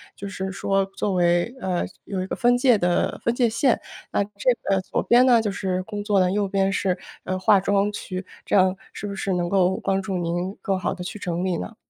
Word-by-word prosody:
就 200 - -7
是 190 -1 -4
说 195 0 0
作 195 +1 -3
为 175 +5 +2
呃， 180 -2 -1 0.2
有 190 -2 -3
一 - - -6
个 - - -3
分 245 0 +3
界 245 -2 +4
的 175 -2 0
分 235 - +2
界 245 -1 +2
线。 240 +2 +2 0.3
那 200 - +2
这 200 - -10 0.3
个 195 -1 +2
左 185 - -2
边 245 +2 +5
呢 245 -3 +6
就 210 -2 -1
是 185 -2 -2
工 205 0 -5
作 205 -2 +2
的， 180 -1 +3
右 205 0 0
边 195 0 +1
是， 185 -2 0 0.3
呃， 185 - -1
化 200 +1 +5
妆 200 +1 +1
区。 185 -2 -5 0.2
这 - - 0
样 185 -1 +4 0.2
是 - - -6
不 200 - -5
是 195 -1 -2
能 175 -1 0
够 190 -1 +2
帮 195 0 +1
助 190 -1 -3
您 175 +3 -2
更 195 -1 0
好 - - -1
地 180 -2 -7
去 190 - -6
整 175 -1 -2
理 180 -2 0
呢？ 90 - -7
195 Hz, 250 characters per minute, -24 LUFS, 185-205 Hz, 0.3 s, 呢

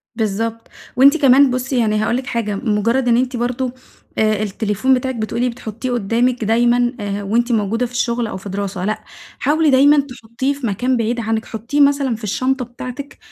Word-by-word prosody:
بالضبط. 225 +1 -2 0.3
وأنتِ 275 +5 +6
كمان 275 -2 +5
بصي 255 +1 -2
يعني 215 -2 +1
هاقول 215 +3 0
لك 260 0 -6
حاجة، 225 -5 -2
مجرد 230 +4 0
إن 235 -1 +4
أنتِ 255 0 -1
برضو، 245 +1 -2 0.5
آآ، 215 -1 +2
التليفون 215 +4 0
بتاعك 260 0 -1
بتقولي 235 +2 -1
بتحطيه 235 +1 -6
قدامك 240 +2 0
دايمًا 240 +2 +2
آآ 205 0 -3
وأنتِ 235 +5 0
موجودة 225 +2 0
في 240 - -8
الشغل 240 -1 -1
أو 200 - -5
في 195 +2 -9
دراسة، 195 -1 -3
لأ 215 +1 -2 0.4
حاولي 310 +1 +2
دايمًا 285 +2 +5
تحطيه 255 0 -3
في 275 -4 -4
مكان 245 +5 0
بعيد 235 +1 -1
عنك، 225 -1 -2
حطيه 235 +6 -2
مثلًا 280 -3 +3
في 220 - -12
الشنطة 255 +5 -1
بتاعتك 250 +3 -8
240 Hz, 180 wpm, -18 LUFS, 220-255 Hz, 0.5 s, وأنتِ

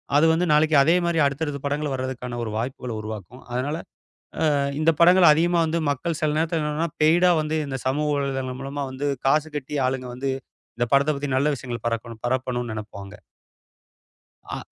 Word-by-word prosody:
அது 150 +2 +5
வந்து 175 +2 +1
நாளைக்கு 155 +1 +4
அதே 165 +4 +4
மாதிரி 170 -2 +1
அடுத்தடுத்துப் 140 0 -2
படங்கள் 145 0 -1
வர்றதுக்கான 130 -2 -4
ஒரு 110 - -4
வாய்ப்புகளை 125 -1 -4
உருவாக்கும். 110 +3 -8
அதனால 140 +5 -1 0.6
அ - - +2 0.4
இந்தப் 155 -1 +2
படங்கள 180 +1 +7
அதிகமா 170 +2 +2
வந்து 160 +1 -1
மக்கள் 145 +4 -2
சில 155 -2 +1
நேரத்துல 160 0 0
பெய்டா 170 +4 +5
வந்து 155 +1 -2
இந்தச் 135 -3 -5
சமூக 150 +3 0
வலைத்தளம் 135 -2 -2
மூலமா 140 +1 -5
வந்து 130 +2 -4 0.2
காசு 150 +3 +3
கட்டி 145 0 -4
ஆளுங்க 130 -1 -2
வந்து 135 +2 -3 0.5
இந்தப் 120 0 -1
படத்த 140 +2 +4
பத்தி 145 0 -3
நல்ல 145 +3 +2
விஷயங்கள 120 -2 -6
பரக்கணும் 115 -1 -4
பரப்பணும்னு 125 -2 -2
நெனைப்பாங்க. 105 -2 -8 1.3
அ - - -3
140 Hz, 165 wpm, -24 LUFS, 125-155 Hz, 1.3 s, படங்கள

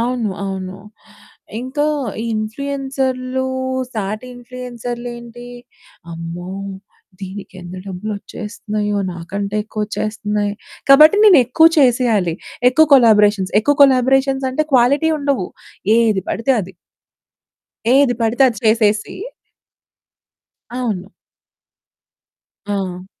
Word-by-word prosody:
అవును. 240 -2 -1 0.2
అవును. 190 -1 -5 0.8
ఇంకా 265 +4 -2 0.4
ఈ - - -4
ఇన్‌ఫ్లూయెన్సర్లూ 260 +2 -3 0.5
సాటి 215 +3 -4
ఇన్‌ఫ్లుయెన్సర్లేంటి, 240 -1 -8 0.6
అమ్మో! 170 +2 -7 0.7
దీనికెంత 190 -2 -9
డబ్బులొచ్చేస్తన్నాయో, 210 +1 -4
నాకంటే 200 +4 -5
ఎక్కువొచ్చేస్తన్నాయి. 210 -1 -3 0.4
కాబట్టి, 305 +7 +8
నేనెక్కువ 320 - +6
చేసెయాలి. 235 - +2 0.4
ఎక్కువ 315 +4 +4
కొలాబరేషన్స్. 210 -6 +4
ఎక్కువ 290 +6 +2
కొలాబరేషన్సంటే, 270 +1 +2
క్వాలిటీ 275 +6 +3
ఉండవు, 280 -9 -1 0.5
ఏది 215 -5 +2
పడితే 265 +4 0
అది. 190 0 -9 1.2
ఏది 275 -3 +4
పడితే 230 +4 +2
అది 235 -4 -3
చేసేసి 215 -1 +2 1.6
అవును. 210 -7 -3 1.6
ఆ! 190 -3 -4
230 Hz, 80 wpm, -18 LUFS, 205-260 Hz, 1.6 s, కాబట్టి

